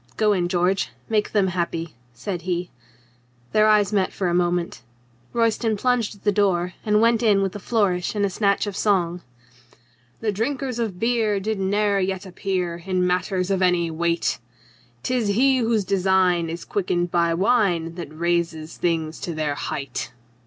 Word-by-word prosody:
"Go 215 -1 +3
in, 180 -3 0
George. 180 +2 +1 0.2
Make 215 -2 +1
them 200 -3 +2
happy," 170 -2 -3 0.2
said 175 - -5
he. 180 0 -3 0.8
Their 215 0 +4
eyes 210 -1 +3
met 190 -2 +1
for 185 -3 -1
a - - 0
moment. 175 -3 0 0.5
Royston 230 -1 +1
plunged 245 -2 0
at 200 - -21
the 205 - +3
door 185 -3 +1
and 210 0 +3
went 230 0 +3
in 205 -4 +3
with 195 +1 -2
a - - -4
flourish 200 -4 0
and 205 -1 +2
a - - 0
snatch 200 +1 +1
of 205 -2 -5
song. 180 -4 +1 1.0
The 220 -2 0
drinkers 250 +4 -2
of 210 -6 -3
beer 225 -3 +1
Did 215 +1 -2
ne'er 200 +1 +1
yet 190 0 -2
appear 180 -2 -2
In 185 -1 0
matters 180 +1 0
of 190 -1 +1
any 175 -2 +2
weight! 170 +1 0 0.6
'Tis 245 0 0
he 260 +6 +3
whose 225 -4 +1
design 185 -3 +2
Is 165 +1 -6
quickened 175 -3 -1
by 170 -1 +2
wine 185 -5 +2
That 170 -4 -7
raises 165 -1 -2
things 165 -2 -1
to 170 - -4
their 155 -2 -1
height. 140 -4 -4
190 Hz, 165 wpm, -23 LUFS, 175-210 Hz, 1.0 s, Their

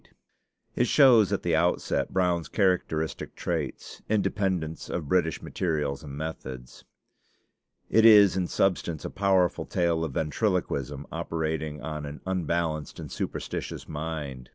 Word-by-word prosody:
It 125 - +2
shows 120 -9 +6
at 100 - -1
the 85 -2 +2
outset 85 +2 +1
Brown's 90 -3 +1
characteristic 90 -6 0
traits 80 -6 -4
independence 95 -6 -1
of 80 -4 -3
British 80 0 +1
materials 75 -6 -2
and 70 -3 -8
methods. 65 -5 -7 1.0
It 110 - +4
is 105 -4 +8
in 90 -2 0
substance 85 -5 0
a - - -4
powerful 95 -3 +2
tale 85 -2 +1
of 80 - -3
ventriloquism 75 - -1
operating 80 -3 -3
on 75 0 -4
an 70 +1 -8
unbalanced 85 -4 -2
and - - -8
superstitious - - -4
mind. 75 -5 -5
80 Hz, 125 wpm, -27 LUFS, 75-95 Hz, 1.0 s, is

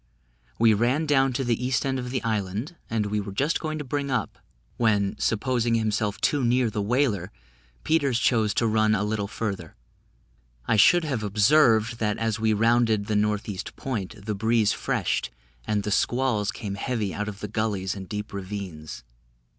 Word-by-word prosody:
We 115 -1 +5
ran 125 +9 +1
down 135 -3 +3
to 135 +2 -1
the 120 -1 -1
east 125 -1 0
end 135 -1 0
of 125 0 -5
the 130 0 -2
island, 110 - -2
and 110 -2 0
were 105 -1 -2
just 140 +11 0
going 155 -1 -3
to 150 - -4
bring 140 +1 -3
up, 125 -6 -2 0.4
when, 105 -4 +2
supposing 120 +1 +1
himself 105 -2 0
too 145 -3 +1
near 120 -1 +2
the 105 - -2
whaler, 105 -4 0 0.5
Peters 140 -6 +2
chose 110 -3 +2
to 115 - +2
run 110 -1 +3
a 105 - 0
little 105 -1 -1
further. 105 -2 -5 0.9
I - - +3
should 175 - +6
have 135 -8 -2
observed, 110 +2 +3
that 105 -2 0
as 115 -1 -1
we 110 0 +2
rounded 115 -1 +2
the 105 - -1
north 105 0 0
east 100 -3 -6
point, 110 -5 -5
the 105 - -1
breeze 110 +1 +2
freshed, - - -1 0.4
and 105 -1 0
the 105 - -3
squalls 120 -2 +1
came 105 -1 -6
heavy 105 -1 -2
out 105 0 -3
of 100 -1 -6
the 105 - -4
gullies 105 -3 -1
and 95 -2 -8
deep 105 0 -5
ravines. 95 -9 -6
110 Hz, 180 wpm, -25 LUFS, 105-125 Hz, 0.9 s, should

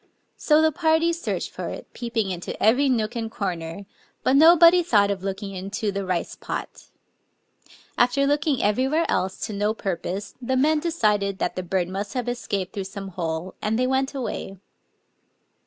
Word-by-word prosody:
So 310 0 +3
the 315 - +4
party 320 +2 +2
searched 335 - -3
for - - -5
it, - - -9
peeping 230 -5 -2
into 175 -1 -5
every 255 +6 +4
nook 225 -3 0
and 225 -1 -3
corner; 180 -3 -4 0.4
but 260 - +3
nobody 335 +3 +7
thought 205 -11 +3
of 195 -2 -3
looking 195 +1 -4
into 200 +3 -3
the 200 0 -3
rice 185 -2 -2
pot. - - -6 1.1
After 250 +3 +3
looking 290 -1 +1
everywhere 265 +10 +2
else 185 0 0
to 215 - -6
no 210 +2 0
purpose, 195 +1 -4
the 260 +1 0
men 305 +4 +3
decided 210 - 0
that - - -2
the 185 - -2
bird 180 0 -1
must 195 +6 -5
have 250 -1 -2
escaped 200 -6 -3
through 195 -2 -4
some 195 0 -7
hole; 170 0 -4
and 215 +1 0
they 255 - +2
went 265 +2 0
away. 215 -6 -4
215 Hz, 170 wpm, -24 LUFS, 195-270 Hz, 1.1 s, nobody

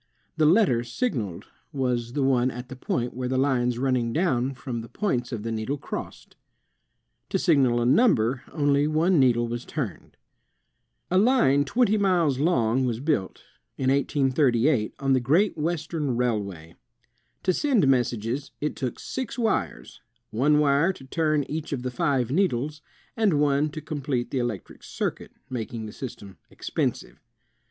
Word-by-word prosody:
The 155 -1 +3
letter 160 - +4
signaled 120 - -3 0.3
was 125 -3 -1
the 140 - 0
one 130 -1 +3
at 125 0 -8
the 130 - -7
point 125 -1 -2
where 125 0 -3
lines 130 -2 +1
running 125 -2 0
down 135 -6 0
from 125 -3 -5
the 115 - -10
points 130 - -2
of 115 -4 -4
the 115 - -3
needle 115 +6 -2
crossed. - - -7 0.9
To - - +1
signal 130 -7 +3
a 120 - 0
number 130 - +3
only 145 -1 +2
one 160 +3 +2
needle 120 -3 +3
was 120 +1 -4
turned. 125 - -6 0.9
A 185 - +4
line 195 - +4
twenty 215 - +2
miles 175 -9 +2
long 130 -6 +2
was 120 -3 -1
built, 140 -9 -1 0.3
in 130 -1 +1
1838, 135 -3 +2
on 135 -1 +1
the 130 - +4
Great 160 +12 +2
Western 155 -4 -2
Railway. 100 -9 -2 0.7
To 185 - +2
send 245 - +2
messages, 125 +1 0
it 150 - -2
took 130 -3 -4
six 260 -3 -5
wires, 220 - -2 0.3
one 145 +7 +3
wire 150 +4 +3
to 135 - -13
turn 155 +1 +1
each 155 +3 -5
of 125 -3 -3
the 130 - -3
five 130 -4 0
needles, 150 -3 0 0.3
and 205 -10 +2
one 145 +1 +2
to 155 +1 -7
complete 145 -5 -3
the 135 - 0
electric 120 -5 -4
circuit, - - -4 0.2
making 115 -3 -5
the 105 - -8
system 100 -7 -8
expensive. - - -3
135 Hz, 150 wpm, -25 LUFS, 120-155 Hz, 0.9 s, letter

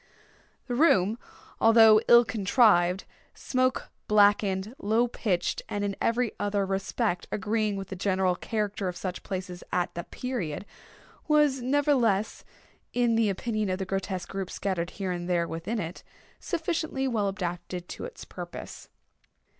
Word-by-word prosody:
The 245 - -4
room, 230 - +3 0.4
although 225 -1 +7
ill 240 0 +8
contrived, 200 -4 +3 0.3
smoke 255 0 -1 0.2
blackened, 205 0 +3
low 225 +4 +2
pitched, 200 -6 -1
and 205 0 -2
in 200 -1 -1
every 235 0 +1
other 205 -1 0
respect 195 0 -1
agreeing 215 -1 0
with 195 -1 -6
the 190 - -5
general 185 -1 +1
character 205 -1 -2
of 180 - -3
such 185 -1 -4
places 185 -2 -6
at 180 -1 0
the 170 - -4
period—was, 255 - -2
nevertheless, 250 -6 +1 0.5
in 240 -1 +2
the 225 -2 +3
opinion 215 +1 -2
of 185 - 0
the 190 - -3
grotesque 185 -1 -3
groups 195 -1 -5
scattered 175 -3 -2
here 195 -3 -2
and 175 0 -4
there 170 -1 +1
within 165 +8 -4
it, 175 -3 -5 0.4
sufficiently 320 -5 -2
well 220 -5 0
adapted 180 -2 -5
to - - -7
its 485 0 -8
purpose. - - -9
205 Hz, 140 wpm, -27 LUFS, 185-235 Hz, 0.5 s, ill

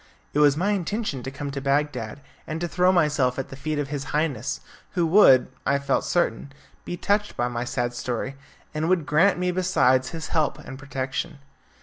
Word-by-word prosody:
It 145 - +1
was 145 -1 +5
my 195 +5 +1
intention 200 - -2
to 130 - -5
come 140 +1 -5
to 140 0 -4
Bagdad 140 -3 -1 0.3
and 155 +1 -3
to 175 - -2
throw 180 +2 +3
myself 150 -7 +2
at 135 - -4
the - - -8
feet 155 +2 -3
of 145 -2 -2
his 140 -2 -4
Highness, 150 -2 -1 0.3
who 175 - +1
would, 160 -7 +6 0.2
I 140 - +2
felt 140 -1 0
certain, 140 -6 0 0.3
be 175 - -4
touched 205 +3 0
by 120 - +1
my 120 0 -3
sad 120 0 -2
story, 120 +2 -3 0.4
and 155 +2 -1
would 180 -5 +2
grant 170 +8 +3
me, 180 0 0
besides, 135 -9 +2
his 165 -1 -6
help 155 -3 +1
and 135 -3 -10
protection. 140 +3 -4
145 Hz, 195 wpm, -25 LUFS, 135-170 Hz, 0.4 s, would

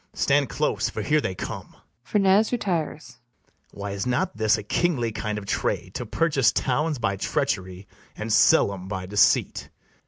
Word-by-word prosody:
Stand 140 -2 +2
close, - - -1
for - - -5
here 150 +1 +2
they 95 - -3
come. - - -7 0.3
[FERNEZE 200 +1 +3
retires.] 160 - -3 0.5
Why, 100 0 -6
is 100 +4 -3
not 125 -4 0
this 110 0 +2
A 105 - -6
kingly 120 - 0
kind 105 0 -3
of 105 - -6
trade, - - -2
to - - -5
purchase 145 -7 +2
towns 150 +4 0
By 100 -4 -1
treachery, 95 0 -2 0.3
and 110 0 -3
sell 100 - +5
'em 95 -1 -8
by 95 -2 -4
deceit? 100 +1 +2
115 Hz, 160 wpm, -24 LUFS, 100-150 Hz, 0.5 s, sell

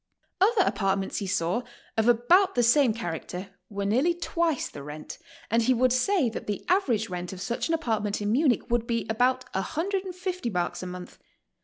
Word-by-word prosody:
Other 410 0 +5
apartments 195 -2 0
he 200 - -3
saw 180 +5 0 0.3
of 220 +1 +2
about 340 - +4
the 245 - +3
same 245 +1 +5
charac 175 -8 -4
ter 185 +2 -6 0.2
were 200 -1 -3
nearly 265 +12 +2
twice 335 -3 0
the 145 - -9
rent, 150 +2 -8 0.3
and 230 +1 +4
he 250 +3 +3
would 250 +1 +3
say 330 +3 +2
that 225 - -5
the 205 -2 -3
avrage 255 - +2
rent 180 0 -4
of 185 - -8
such 195 +5 -2
an 330 - +2
apartment 220 -9 -1
in 205 0 -1
Munich 255 -1 +2
would 235 -1 +1
be 230 -1 -1
about 255 +3 +2
150 365 - -2
marks 175 -4 -2
a 185 - -5
month. 180 0 -9
235 Hz, 185 wpm, -27 LUFS, 200-320 Hz, 0.3 s, Other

